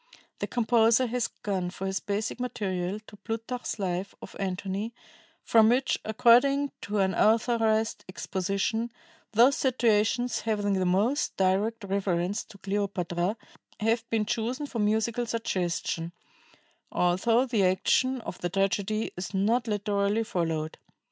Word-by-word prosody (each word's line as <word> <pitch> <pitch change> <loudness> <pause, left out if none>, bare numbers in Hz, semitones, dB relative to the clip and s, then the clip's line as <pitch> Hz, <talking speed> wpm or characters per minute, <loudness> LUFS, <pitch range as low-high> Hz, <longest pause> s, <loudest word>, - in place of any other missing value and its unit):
The - - -2
composer 235 +1 +3
has 245 0 -1
gone 190 -3 -3
for 190 +1 -6
his 190 0 -1
basic 210 +3 -3
material 200 -6 -2
to 210 - -14
Plutarch's 225 +5 -4
Life 190 -1 -3
of - - -11
Antony, 195 +3 -3 0.5
from 220 -1 +5
which, 255 +3 +2
according 250 +6 +4
to 210 +1 -3
an 190 -1 +2
authorized 225 0 +2
exposition, 195 +5 -2 0.4
"those 245 +5 +6
situations 240 -1 +2
having 205 -2 0
the 185 -1 +1
most 215 +11 +1
direct 200 +4 +1
reference 195 0 -1
to 210 - -15
Cleopatra 195 -1 -2 0.4
have 225 +2 0
been 220 -2 +1
chosen 240 +7 -2
for 250 -5 -5
musical 220 +3 +1
suggestion, 175 -6 -2 0.8
although 225 +8 +2
the 230 -6 +1
action 250 +7 +2
of 180 - -7
the 175 - -2
tragedy 195 +3 0
is 180 +2 -5
not 225 +5 +2
literally 205 0 0
followed." 165 -6 -2
210 Hz, 130 wpm, -28 LUFS, 190-230 Hz, 0.8 s, those